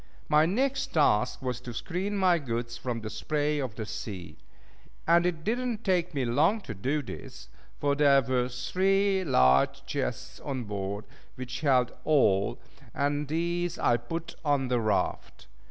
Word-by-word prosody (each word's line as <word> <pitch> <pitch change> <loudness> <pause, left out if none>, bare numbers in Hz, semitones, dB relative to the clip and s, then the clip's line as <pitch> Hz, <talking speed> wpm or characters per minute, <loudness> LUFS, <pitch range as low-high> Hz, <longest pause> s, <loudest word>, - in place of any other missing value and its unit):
My 155 +1 +4
next 265 +8 0
task 125 -5 +2
was 125 -1 -3
to 120 -2 -8
screen 190 - -3
my 180 -3 +4
goods 120 -3 -3
from 120 -1 -4
the 110 - -5
spray 150 +6 -1
of 130 -6 -4
the 110 - -4
sea; 95 -4 -7 0.7
and 170 +1 +4
it 165 -3 -3
did 230 +7 0
not 245 -4 -3
take 180 -4 +1
me 135 -2 0
long 155 - +3
to 120 - -6
do 135 +10 -1
this, - - -9 0.3
for 145 -1 +1
there 140 -2 +5
were 125 0 0
three 190 +10 +1
large 65 - +3
chests - - -4
on 135 -3 -4
board 100 -1 -4 0.3
which 130 +1 -6
held 130 -5 +3
all, 100 -11 +3 0.4
and 145 +1 0
these 170 +3 -1
I 120 - +3
put 165 +8 -6
on 140 -4 +1
the 125 -1 +2
raft. 110 -2 -1
140 Hz, 160 wpm, -28 LUFS, 120-170 Hz, 0.7 s, there